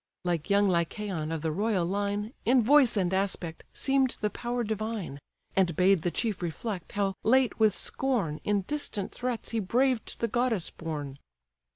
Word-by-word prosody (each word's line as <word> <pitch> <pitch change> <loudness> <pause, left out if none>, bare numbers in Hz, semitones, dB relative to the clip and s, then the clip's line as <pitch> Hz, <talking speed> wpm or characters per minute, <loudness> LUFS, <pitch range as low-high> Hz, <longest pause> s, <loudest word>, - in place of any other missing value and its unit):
Like 170 -2 -1
young 200 0 +4
Lycaon, 170 -2 -1
of 165 -1 -3
the 160 - 0
royal 200 +1 +1
line, 205 +4 -2
In 250 0 +4
voice 265 -2 +5
and 185 -2 +1
aspect, 190 -4 -2
seem'd 270 -1 +1
the 210 -1 0
power 240 0 -2
divine; 215 -8 -3 0.4
And 180 -4 +2
bade 185 0 +4
the 175 - 0
chief 215 +2 -2
reflect, 175 +2 -4
how 200 -1 0
late 255 +1 +3
with 215 -3 +4
scorn 225 - -1
In 205 -1 +1
distant 210 -4 -3
threats 245 -2 -3
he 230 - 0
braved 245 +4 +1
the 230 - +1
goddess 230 -5 0
born. 145 -4 -5
205 Hz, 165 wpm, -29 LUFS, 175-230 Hz, 0.4 s, voice